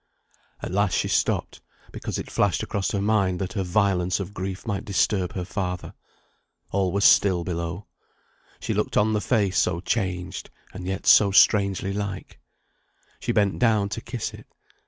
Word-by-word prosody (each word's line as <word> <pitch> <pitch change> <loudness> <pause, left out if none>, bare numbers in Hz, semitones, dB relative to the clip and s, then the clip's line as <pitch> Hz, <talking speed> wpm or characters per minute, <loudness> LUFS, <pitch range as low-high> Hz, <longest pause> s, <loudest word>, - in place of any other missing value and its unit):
At - - -4
last 100 0 +1
she - - 0
stopped, - - 0 0.3
because - - -5
it - - -6
flashed - - +1
across 100 -1 -2
her 100 -1 -1
mind 100 -4 +2
that 95 +4 -4
her 100 - -1
violence 95 -1 +1
of 100 +1 -6
grief 95 +1 -5
might 100 -4 -2
disturb 95 -2 0
her 90 -2 -4
father. 90 -2 -4 0.8
All 95 -2 +1
was 100 +2 +1
still 90 -4 +5
below. 85 +2 -4 0.7
She - - -2
looked - - -1
on 110 +1 +3
the 105 - 0
face 105 -6 +1
so 85 -1 +1
changed, 90 -2 -3 0.2
and 95 -1 -7
yet 95 0 -4
so 100 - +7
strangely 100 -1 +3
like. 100 -2 -5 0.8
She - - -2
bent 100 -2 +1
down 110 -4 +2
to 115 - -5
kiss 120 -1 -5
it. - - -13
100 Hz, 165 wpm, -24 LUFS, 90-105 Hz, 0.8 s, so